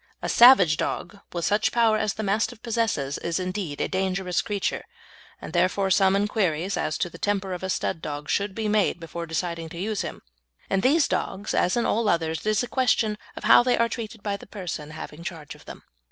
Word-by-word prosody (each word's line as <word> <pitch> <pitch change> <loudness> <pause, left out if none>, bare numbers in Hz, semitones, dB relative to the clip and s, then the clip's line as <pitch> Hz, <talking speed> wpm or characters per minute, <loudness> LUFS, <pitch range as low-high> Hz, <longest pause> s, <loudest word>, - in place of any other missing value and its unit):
A - - -1
savage 200 -11 +7
dog 205 - -3
with 170 -1 -2
such 210 +1 +2
power 230 -2 +3
as 215 -2 -1
the 220 - -4
Mastiff 215 +3 -1
possesses 220 - -1
is 170 +1 -2
indeed 185 -5 -4
a - - 0
dangerous 190 -1 -1
creature, 205 -3 -2 0.6
and, - - -9
therefore, 185 +2 +1
some 190 0 +4
inquiries 195 -3 0
as 155 - -1
to - - -1
the 170 -1 -12
temper 200 -2 -1
of 180 - -5
a 190 - -4
stud 165 - -2
dog 145 -1 -5
should 200 +3 -1
be 220 -1 -2
made 210 -4 +1
before 170 +1 -6
deciding 165 0 -3
to 170 - -10
use 210 +2 -2
him. - - -6 0.5
In 195 - +2
these 290 +6 +4
dogs, 200 +2 -2
as 180 - +2
in 235 - +1
all 220 -1 +1
others, 160 -3 0
it - - -8
is 215 +3 +2
a - - -4
question 240 -4 +1 0.2
of - - -8
how - - +7
they 245 0 +2
are 230 - +3
treated 225 -2 -7
by 200 -1 -2
the - - -14
person 175 -7 -6
having 155 +1 -9
charge 165 -6 -7
of - - -17
them. - - -10
195 Hz, 215 wpm, -25 LUFS, 170-215 Hz, 0.6 s, savage